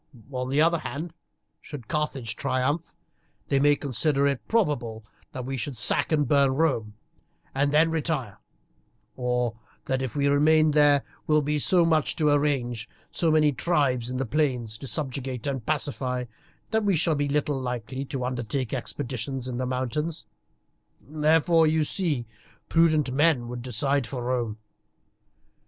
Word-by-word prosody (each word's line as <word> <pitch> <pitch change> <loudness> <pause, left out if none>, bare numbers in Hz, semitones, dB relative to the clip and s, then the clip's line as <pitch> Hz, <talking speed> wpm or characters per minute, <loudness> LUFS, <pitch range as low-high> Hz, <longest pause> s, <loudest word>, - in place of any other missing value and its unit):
On 125 -1 -3
the 140 +2 +1
other 165 +1 +3
hand, 155 +4 -5 0.5
should 130 -7 -9
Carthage 135 -7 -2
triumph, 140 +8 -1 0.5
they 140 - +3
may 145 +1 +5
consider 140 +1 0
it 140 -3 -1
probable 135 - 0 0.3
that 130 -1 -6
we 135 +1 -3
should 125 +2 -4
sack 110 - 0
and 150 -3 +2
burn 140 -1 +3
Rome 130 -9 0 0.6
and 140 +1 +1
then 160 +2 +4
retire, 150 -10 -2 0.8
or 125 -2 -1 0.3
that 130 0 -1
if 130 0 -4
we 140 -1 +2
remain 155 +2 +4
there 145 -2 +4 0.2
will 155 -1 +3
be 150 +1 0
so 175 +3 +4
much 160 -2 +2
to 150 -3 +2
arrange, 125 -6 0 0.2
so 170 - +1
many 155 -1 +4
tribes 130 -5 +1
in 130 - -3
the 135 - -1
plains 125 -5 -1
to 135 - -7
subjugate 130 -4 -3
and 135 -5 -3
pacify, 130 -4 -2 0.5
that 220 -1 +1
we 200 -3 +2
shall 165 0 +3
be 145 -1 -1
little 145 -1 0
likely 125 +1 -4
to 130 -2 -4
undertake 125 0 -3
expeditions 130 -1 -3
in 125 -1 -4
the 130 - -1
mountains. 130 +3 -2 0.7
Therefore, 160 +2 +3
you 155 0 +2
see, 150 -9 -1 0.4
prudent 155 -5 +3
men 140 -3 +2
would 125 0 -5
decide 130 +2 0
for 125 -2 -5
Rome. 120 -3 -1
140 Hz, 150 wpm, -26 LUFS, 125-155 Hz, 0.8 s, may